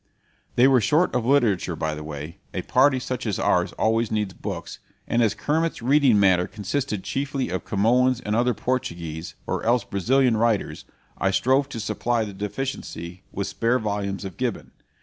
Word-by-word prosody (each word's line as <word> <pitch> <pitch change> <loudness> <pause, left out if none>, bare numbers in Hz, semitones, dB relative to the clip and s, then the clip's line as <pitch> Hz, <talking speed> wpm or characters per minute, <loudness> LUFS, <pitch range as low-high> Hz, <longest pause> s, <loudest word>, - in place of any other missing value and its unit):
They 125 +2 +6
were 130 -3 +5
short 155 - +2
of 115 - 0
literature, 110 -11 +2
by 80 -1 -2
the 75 0 -6
way 75 +2 -7 0.2
a - - -2
party 130 +1 +4
such 125 -1 -4
as 100 - -1
ours - - +2
always 115 0 +1
needs 105 -3 -1
books - - -6 0.3
and 120 - +2
as 110 -3 +2
Kermit's 160 -3 -1
reading 135 -4 +4
matter 95 -2 +4
consisted 105 0 -3
chiefly 135 -1 -2
of 90 -2 -3
Camoens 125 +5 +2
and 105 -3 -2
other 120 0 +2
Portuguese, 85 -9 -3
or - - -2
else 120 +1 +2
Brazilian, 120 +4 +2
writers, 115 -2 0 0.3
I 95 - +2
strove 130 +7 +2
to 120 - -6
supply 115 +1 -1
the 100 - -7
deficiency 100 - -5
with 100 - -3
spare 115 +4 +1
volumes 100 -3 -3
of 95 -4 -7
Gibbon. - - -3
115 Hz, 170 wpm, -24 LUFS, 95-130 Hz, 0.3 s, They